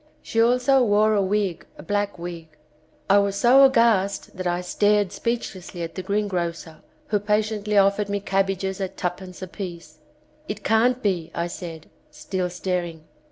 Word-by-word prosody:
She 225 - 0
also 250 +3 +4
wore 215 -1 +3
a 205 - +3
wig, 195 -3 -1
a - - -10
black 205 +2 -1
wig. 170 -1 -7 0.6
I 200 +1 +6
was 200 -1 0
so 250 +6 +6
aghast 230 -7 +2
that 185 -1 -3
I 175 0 0
stared 205 +1 +2
speechlessly 190 -8 -4
at 165 - -6
the 185 - -5
greengrocer 175 -5 -3 0.3
who 210 - +2
patiently 210 0 0
offered 200 +1 +3
me 200 0 -1
cab 195 -1 +1
bages 190 0 -3
at 190 - -4
"tuppence" 180 +1 -5
a - - -5
piece. 170 -5 -8 0.5
"It 205 0 -5
can't 245 +4 +2
be," 175 -5 0
I 170 - -1
said, 170 -2 -8 0.2
still 180 +4 -3
staring. 175 -3 -3
195 Hz, 160 wpm, -24 LUFS, 180-210 Hz, 0.6 s, I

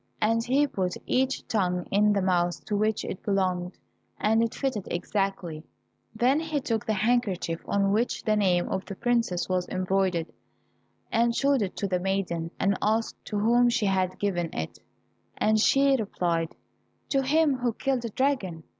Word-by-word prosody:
And 225 +2 +2
he 270 +5 +3
put 185 -9 -2
each 265 +1 0
tongue 180 -4 0
in 210 +1 +4
the 200 -2 +1
mouth 175 -2 0
to 210 - -2
which 215 +1 0
it 185 - -5
belonged, 185 -3 0 0.5
and 220 +2 +3
it 230 -1 -1
fitted 255 -8 -2
exactly. 180 -3 -2 0.5
Then 255 +6 +3
he 315 -2 -2
took 225 -5 -2
the 220 - +2
handkerchief 205 -6 0
on 200 -1 +1
which 225 +4 0
the 215 - +2
name 185 -4 +2
of 190 - -2
the 195 - -7
princess 230 -6 0
was 180 -1 -1
embroidered, 185 -2 0 0.8
and 235 +1 +2
showed 275 -1 +2
it 195 -3 -2
to 200 - -1
the 180 -1 0
maiden, 180 -3 -1
and 195 0 +1
asked 220 +2 0
to 210 - -3
whom 240 +3 +4
she 235 -3 +1
had 190 -2 0
given 175 -5 -1
it, 80 - -5 0.6
and 215 0 +2
she 275 +4 +4
replied, 175 -7 -1 0.5
"To 275 - +2
him 290 +1 +2
who 245 -1 0
killed 265 +2 -1
the 235 - -4
dragon." 210 - -1
205 Hz, 170 wpm, -27 LUFS, 185-240 Hz, 0.8 s, in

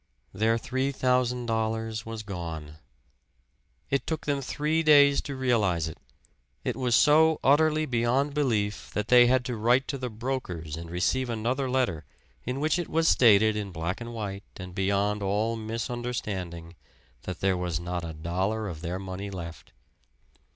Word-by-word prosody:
Their 110 +4 +2
three 130 +3 -1
thousand 125 -2 +1
dollars 110 -1 -2
was 115 -1 -5
gone. 80 -6 -6 1.1
It 140 - 0
took 160 -2 -3
them 140 -1 0
three 150 +4 0
days 145 -3 +6
to 140 - -6
realize 105 -11 +1
it 80 - -8 0.6
it - - -1
was 125 -2 +1
so 160 +2 +5
utterly 155 +2 +4
beyond 130 +2 +1
belief, 110 -8 -1
that 105 0 -2
they 125 -1 +7
had 125 0 +2
to 125 - -2
write 120 +5 +2
to 140 - -3
the 125 -1 -3
brokers 110 - -4
and 85 0 -8
receive 110 +9 0
another 125 +4 -1
letter 125 -12 0 0.4
in 125 +2 -2
which 155 +3 +1
it 175 - -4
was 165 0 +2
stated 110 -5 +5
in 105 -2 -4
black 85 +5 -3
and 120 0 -6
white 100 -4 -5 0.2
and 90 -1 -8
beyond 100 +2 0
all 105 +4 0
misunderstanding 110 -7 -4 0.5
that 90 +2 -6
there 95 -1 +2
was 90 -2 -2
not 90 0 -4
a 85 - -5
dollar 95 +7 -2
of 80 -5 -6
their 90 +1 -3
money 95 +1 -6
left. 85 -6 -8
110 Hz, 160 wpm, -27 LUFS, 95-130 Hz, 1.1 s, they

